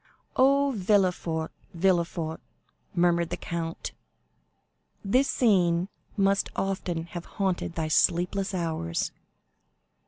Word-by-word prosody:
"Oh, 275 +1 +4
Villefort, 180 -5 +1 0.2
Villefort," 170 -2 0 0.5
murmured 170 -1 +3
the - - -3
count, 165 -1 -4 1.1
"this 255 +8 +3
scene 180 -6 +3 0.3
must 195 0 +2
often 185 -4 -2
have 175 0 -7
haunted 185 -3 -1
thy 160 -1 -1
sleepless 180 +5 +2
hours!" 160 - -1
175 Hz, 90 wpm, -27 LUFS, 170-195 Hz, 1.1 s, Oh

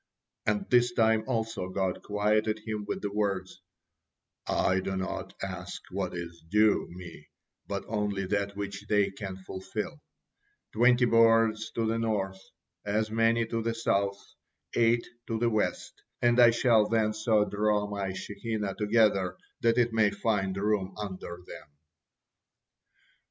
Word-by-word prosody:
And 200 -2 0
this 120 -1 +4
time 110 -1 +3
also 115 -6 -2
God 95 -1 -1
quieted 105 +1 0
him 105 -2 -3
with - - -4
the 100 - -2
words, 95 -3 -2 0.9
"I 95 +1 +2
do 95 0 -3
not 95 0 -4
ask - - -5
what 95 -1 -3
is 85 -1 -7
due 105 +2 +3
Me, 85 -3 -11 0.4
but - - -3
only 105 -3 -1
that 100 +1 -1
which 100 0 -6
they 105 -2 +2
can 95 -2 -6
fulfil; 95 -3 -6 0.7
twenty 125 +2 +5
boards 115 -1 +4
to 115 - 0
the 115 +1 0
north, 95 -4 -1 0.4
as 110 +1 -1
many 115 +1 +3
to 115 0 -2
the 115 0 -1
south, 100 -3 0 0.6
eight 115 0 +3 0.2
in 115 - 0
the 120 +1 +1
west, 110 -1 -2 0.2
and 120 0 +3
I 120 -1 +9
shall 115 -2 +4
then 110 -1 +2
so 110 -1 +2
draw 105 0 +1
My 100 -2 -3
Shekinah 100 +1 -4
together 105 -4 +2 0.2
that 115 0 +2
it 120 -1 +2
may 110 -2 +4
find 100 -4 -1
room 100 -2 0
under 95 -3 -6
them." - - -10
105 Hz, 140 wpm, -29 LUFS, 95-115 Hz, 0.9 s, I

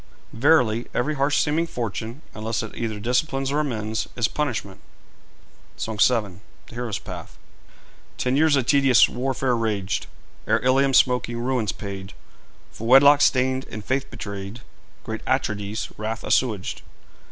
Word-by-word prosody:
Verily, 120 -3 +3
every 150 +5 0
harsh 140 0 +1
seeming 160 +3 0
fortune, 115 - -5
unless 110 +1 -3
it 110 - -8
either 110 -3 -3
disciplines 135 +4 0
or 145 - +1
amends, 110 -6 -2
is 115 -2 +1
punishment.' 120 -10 -3 1.0
SONG 110 -2 -4
VII. 105 -6 +2 0.3
THE - - -15
HERO'S 120 -3 -3
PATH. - - -9 0.8
Ten 125 +1 0
years 155 0 +4
a 135 - +2
tedious 135 -2 +5
warfare 130 0 -1
raged, 105 -5 -2 0.4
Ere - - +4
Ilium's 135 +1 +4
smoking 125 -2 +2
ruins 120 -3 0
paid 100 -2 -7 0.6
For 115 - -7
wedlock 140 +3 +7
stained 130 0 +2
and 110 -1 -7
faith 135 +1 -1
betrayed, 100 -2 -6
And 115 +5 -10 0.4
great 110 0 -6
Atrides' 105 -5 -1
wrath 110 +2 -4
assuaged. 110 -8 0
120 Hz, 140 wpm, -23 LUFS, 110-135 Hz, 1.0 s, wedlock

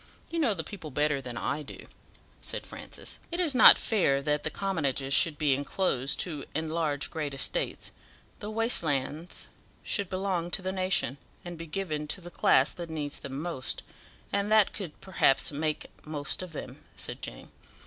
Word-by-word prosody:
You 335 - -1
know 245 -10 +3
the 160 - -3
people 180 -6 -8
better 150 0 +1
than 125 -2 -6
I 140 +5 -1
do," 145 - -10 0.5
said - - -4
Francis. - - -8
"It 340 - -2
is 335 -6 +3
not 255 - +10
fair 175 -11 +2
that 150 0 +1
the - - -1
commonages 140 -8 -1
should 155 0 +5
be 145 -3 +3
enclosed 140 -1 +1
to 150 -6 -3
enlarge 160 -2 -1
great 150 -3 -3
estates; 135 - -1 0.5
the 210 - -5
waste 225 +2 +4
lands 150 +2 -1 0.4
should 200 -4 0
belong 185 -3 -1
to 185 - -1
the 190 - -1
nation, 185 -7 0 0.3
and 175 0 -5
be 165 0 -8
given 155 -3 -3
to 185 - -3
the 175 -1 -10
class 135 -3 +4
that 170 -2 -7
needs 150 -3 -3
them 135 0 -5
most, 160 -6 -3 0.5
and 200 +1 +1
that 215 -2 +5
could, 185 -7 -7
perhaps, 170 -8 +3
make 155 +1 -2
most 150 0 -2
of 185 -2 -7
them," 155 - -8
said - - -4
Jane. - - -7
160 Hz, 175 wpm, -29 LUFS, 145-190 Hz, 0.5 s, not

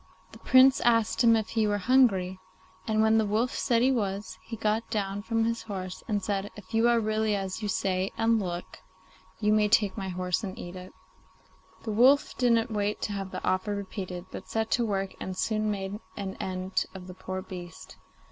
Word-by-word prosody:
The - - -13
Prince 260 +1 +6
asked 230 0 +3
him 230 -1 +6
if 220 -1 -1
he 220 -2 +1
were 205 0 +1
hungry, 195 -5 +3 0.5
and 220 -1 +2
when 220 0 +4
the 220 - +2
wolf 225 +5 0
said 235 -1 +1
he 265 - +4
was, 205 -4 -2
he 230 - -6
got 215 +1 -1
down 200 -2 -2
from 225 +1 0
his 230 0 -1
horse 185 -4 -6
and 205 -2 -1
said, 200 -1 -2
'If 210 0 -13
you 225 +1 +4
are 235 -1 +4
really 215 -1 0
as 195 +1 -4
you 210 - -2
say 190 -1 0
and 225 0 +3
look, 175 -3 -5 0.6
you 210 -1 +2
may 215 -1 +4
take 210 -2 +3
my 190 -1 -4
horse 180 0 -1
and 190 -2 -5
eat 175 +1 -7
it.' 185 0 -10 0.9
The 220 - -3
wolf 260 +7 +4
didn't 235 -1 +2
wait 210 0 -1
to - - -2
have 195 -1 -4
the 185 - -6
offer 185 +3 0
repeated, 185 -3 -6
but 190 - -8
set 220 0 -1
to 240 - +2
work, 195 -2 -2
and 185 -1 -5
soon 215 +1 0
made 200 0 -3 0.2
an 195 -1 -4
end 185 0 -2
of 185 -1 -8
the 185 - -9
poor 185 0 -5
beast. 175 -3 -10
205 Hz, 205 wpm, -28 LUFS, 190-225 Hz, 0.9 s, Prince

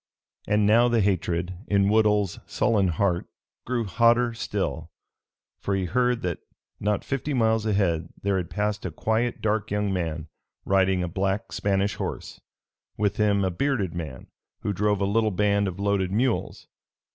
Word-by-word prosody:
And 105 0 +3
now 115 +4 +5
the 120 -2 +2
hatred 90 -2 0
in 100 -1 +3
Woodhull's 105 -3 +2
sullen 105 -4 +2
heart 90 +1 0 0.4
grew 120 -1 0
hotter 115 +4 +3
still, 115 - -3 0.7
for 100 - -1
he 95 -1 -1
heard 125 +5 +1
that 90 -2 -2 0.4
not 105 0 0
fifty 135 +2 -2
miles 110 -2 +2
ahead 85 -6 +1
there 100 -1 0
had 90 -2 -3
passed 105 0 -2
a 95 - -2
quiet 110 +8 -1
dark 110 -1 0
young 105 -1 0
man, 80 -3 -3 0.4
riding 95 -1 +2
a - - -1
black 95 +4 -2
Spanish 100 0 0
horse; - - -5 0.6
with 105 0 0
him 105 -2 +2
a 95 - 0
bearded 105 - -1
man 80 -7 -6 0.4
who 105 - -1
drove 105 +1 +1
a - - +2
little 110 +2 +2
band 100 +1 +1
of 95 0 -5
loaded 100 -2 0
mules! 120 +4 -1
100 Hz, 155 wpm, -25 LUFS, 95-110 Hz, 0.7 s, now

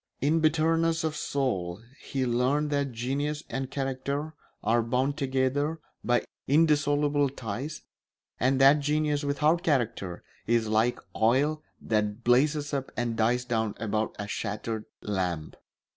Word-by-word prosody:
In 155 +4 +2
bitterness 165 +1 +2
of 155 -1 -1
soul 100 -13 -1 0.2
he 135 -2 -2
learned 130 +5 +1
that 140 -2 0
genius 140 +6 -2
and 135 -1 -3
character 140 +3 -3 0.3
are 115 +1 +3
bound 130 +5 0
together 140 +3 0 0.2
by 120 0 +2 0.2
indissoluble 145 -1 +3
ties, 130 +3 -5 0.6
and 130 +2 +2
that 135 +2 +7
genius 150 0 0
without 150 +4 +2
character 115 - -1 0.2
is 115 -1 +2
like 110 +3 +2 0.2
oil 135 +8 +2 0.2
that 105 +1 -1
blazes 145 +4 +2
up 135 -1 -2
and 120 -1 -1
dies 120 +2 +1
down 110 -3 -1
about 110 0 -1
a 105 - -4
shattered 105 +2 -3 0.2
lamp. 90 -6 -2
135 Hz, 130 wpm, -28 LUFS, 115-150 Hz, 0.6 s, that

